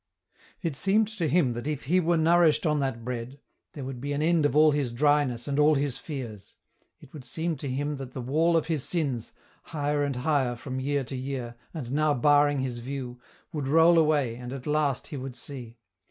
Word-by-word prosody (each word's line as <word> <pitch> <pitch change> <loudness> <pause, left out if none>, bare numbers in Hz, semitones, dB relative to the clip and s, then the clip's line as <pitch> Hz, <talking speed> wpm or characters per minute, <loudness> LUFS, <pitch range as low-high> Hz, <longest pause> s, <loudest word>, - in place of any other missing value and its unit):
It 165 -5 -1
seemed 205 +7 +2
to 165 - +1
him 145 -5 +2
that 120 +4 -5
if 150 -2 -3
he 175 +7 +2
were 170 -1 +2
nourished 165 0 +4
on 150 -1 +2
that 130 -5 -2
Bread, 125 +2 -5 0.3
there 145 - -7
would 130 -2 -6
be 145 +1 -2
an 145 - -1
end 165 -2 +3
of 140 - -4
all 155 0 +6
his 145 -4 0
dryness 140 -2 +1
and 140 0 0
all 150 +1 +5
his 140 -2 -1
fears; 120 - -7 0.4
it - - -17
would 150 -4 -9
seem 160 +6 -3
to 140 - -5
him 145 +3 -2
that 130 -2 -8
the - - -5
wall 160 +7 +2
of 160 - 0
his 160 -5 -1
sins, 140 -10 -2 0.3
higher 145 -2 -1
and 140 -2 -1
higher 130 -2 +1
from 130 +2 -5
year 140 +1 0
to 130 - -7
year, 130 -2 -4 0.2
and 135 -8 -6
now 150 +1 +2
barring 145 +2 +4
his 125 -2 -3
view, 125 -1 -6 0.3
would 145 -4 -3
roll 165 +3 +6
away, 145 -7 +2
and 125 0 -7
at 135 -2 -7
last 150 -3 0
he 145 - -5
would 130 -1 -6
see. 125 -5 -9
145 Hz, 210 wpm, -27 LUFS, 130-155 Hz, 0.4 s, all